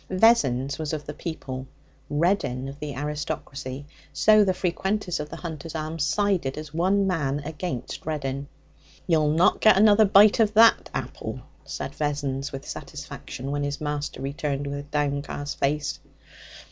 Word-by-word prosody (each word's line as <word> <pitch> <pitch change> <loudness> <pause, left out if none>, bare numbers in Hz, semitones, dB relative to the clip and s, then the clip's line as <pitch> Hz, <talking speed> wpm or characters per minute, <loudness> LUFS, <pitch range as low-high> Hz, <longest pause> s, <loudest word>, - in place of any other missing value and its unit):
Vessons 140 - +3
was 155 -1 -3
of 150 -1 -4
the 150 - -6
people, 135 -5 -6 0.4
Reddin 145 -5 0
of 140 +1 -8
the 150 -2 -5
aristocracy, 145 -1 -4 0.3
so 215 -1 +5
the 190 - +2
frequenters 190 +1 -1
of 150 0 -5
the - - -7
Hunter's 165 -1 -7
Arms 155 0 -2
sided 180 -5 +1
as 155 -1 -7
one 190 +4 +2
man 150 -7 0
against 155 -4 -5
Reddin. 140 -3 -3 0.6
'You'll 155 -4 +3
not 165 +4 +3
get 215 -3 +7
another 215 +1 +6
bite 205 +2 +6
of 215 -1 +3
that 225 +1 +6
apple,' - - -5 0.2
said - - -5
Vessons 145 -2 -2
with 135 0 -7
satisfaction, 135 +2 -7
when 145 0 -1
his 145 0 -2
master 145 -3 -3
returned 140 0 -2
with 145 0 -5
downcast 145 -1 -2
face. 145 +1 0
150 Hz, 145 wpm, -25 LUFS, 140-180 Hz, 0.6 s, get